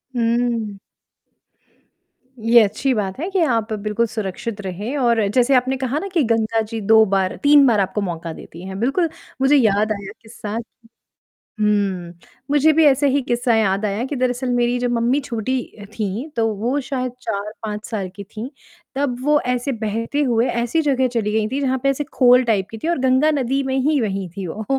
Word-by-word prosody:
हुँ। 230 -3 0 1.7
ये 235 +1 +7
अच्छी 260 +6 0
बात 200 -1 -3
है 340 +5 -3
कि 380 - +1
आप 225 -6 0
बिल्कुल 210 +2 -1
सुरक्षित 215 0 -5
रहें 205 +8 -4
और 235 -5 +2
जैसे 250 +2 +4
आपने 260 +1 +1
कहा 265 +3 -1
ना 395 - -5
कि 325 -5 +3
गंगा 225 0 +1
जी 225 - -3
2 220 +2 +6
बार 190 -1 0
3 290 -1 +7
बार 220 -3 +3
आपको 200 +2 -1
मौका 170 -3 -4
देती 170 +2 -11
हैं। 190 0 -6
बिल्कुल 285 - +1 0.3
मुझे 275 +2 +5
याद 215 -4 +3
आया 200 -2 -4
किस्सा 220 -2 -9 1.1
हुँ, 195 -5 0 0.4
मुझे 295 +2 +4
भी 315 +1 +4
ऐसे 285 0 +4
ही 280 +1 +1
किस्सा 240 -1 +1
याद 205 -2 +1
आया 210 +3 -1
कि 285 - -2
दरअसल 250 0 -1
मेरी 245 0 +1
जो 245 - 0
मम्मी 240 +4 +1
छोटी 255 0 -2 0.3
थी 215 +6 -3
तो 225 - +2
वो 240 +7 -1
शायद 255 -2 -3
4-5 210 0 -5
साल 200 -5 -4
की 200 - -7
थी। 220 +6 -8 0.4
तब 270 -3 -1
वो 295 0 +4
ऐसे 250 +3 -2
बहते 230 +6 -2
हुए 240 -1 +2
ऐसी 240 +7 0
जगह 265 -4 +2
चली 225 -3 -1
गई 215 0 +1
थी 275 - -1
जहाँ 265 -1 0
पे 275 - +4
ऐसे 275 +2 -2
खोल 250 0 +5
टाइप 200 -4 0
की 225 - -8
थी 320 - -4
और 340 - +1
गंगा 260 +4 +3
नदी 275 -1 0
में 265 0 -1
ही 300 -4 +2
बहीं 195 -4 -2
थी 195 - -4
वो। 210 +6 -6
235 Hz, 190 wpm, -20 LUFS, 210-265 Hz, 1.7 s, ये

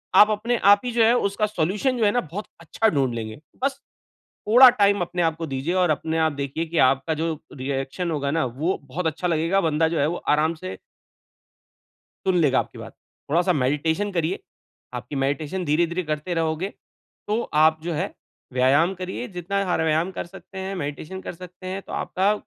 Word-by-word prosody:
आप 210 - +8
अपने 230 +3 0 0.2
आप 205 - +1
ही 245 - -1
जो 230 -1 +3
है 225 +2 +5 0.2
उसका 210 +2 0
सॉल्यूशन 210 - 0
जो 225 - +2
है 205 - +4
न 245 - +3
बहुत 205 +4 -4
अच्छा 195 +7 +1
ढूँढ 135 - +1
लेंगे। 110 +1 -5 0.2
बस 275 0 0 0.7
थोड़ा 250 +4 +9
टाइम 205 -4 +3
अपने 175 0 -1
आप 160 -1 +1
को 165 -1 -4
दीजिए 135 +6 -2
और 180 -3 +3
अपने 160 +2 -1
आप 160 -1 +2
देखिए 140 +3 -3
कि 165 0 -2
आपका 135 +5 +1
जो 165 0 0 0.2
रिएक्शन 135 +6 -3
होगा 140 -3 -1
न 160 +2 +1 0.2
वो 175 +5 0
बहुत 165 +6 -4
अच्छा 160 +3 -1
लगेगा। 165 +4 +2
बंदा 160 -1 +2
जो 165 0 -1
है 140 - +3
वो 175 - -2
आराम 155 +2 +3
से 95 - -7 1.5
सुन 185 -1 +3
लेगा 140 -5 +3
आपकी - - -3
बात। - - -9 0.4
थोड़ा-सा 175 +4 +3
मेडिटेशन 160 +7 0
करिए। 170 +2 -1 0.6
आपकी 125 +3 -6
मेडिटेशन 150 +6 -2
धीरे-धीरे 170 +3 +1
करते 155 +2 -3
रहोगे 165 +4 -1 0.6
तो 215 +3 +1 0.2
आप 160 0 +4
जो 170 - -3
है - - -3 0.4
व्यायाम 140 +9 +3
करिए, 185 +6 -5
जितना 195 +1 -2
हर 160 - +1
व्यायाम 160 +4 +1
कर 185 - -5
सकते 190 +2 -12
हैं, 190 +1 -4
मेडिटेशन 155 +4 -5
कर - - -5
सकते 180 +1 -11
हैं, 190 +1 -4
तो - - -11
आपका 195 +3 +1
165 Hz, 190 wpm, -24 LUFS, 150-190 Hz, 1.5 s, थोड़ा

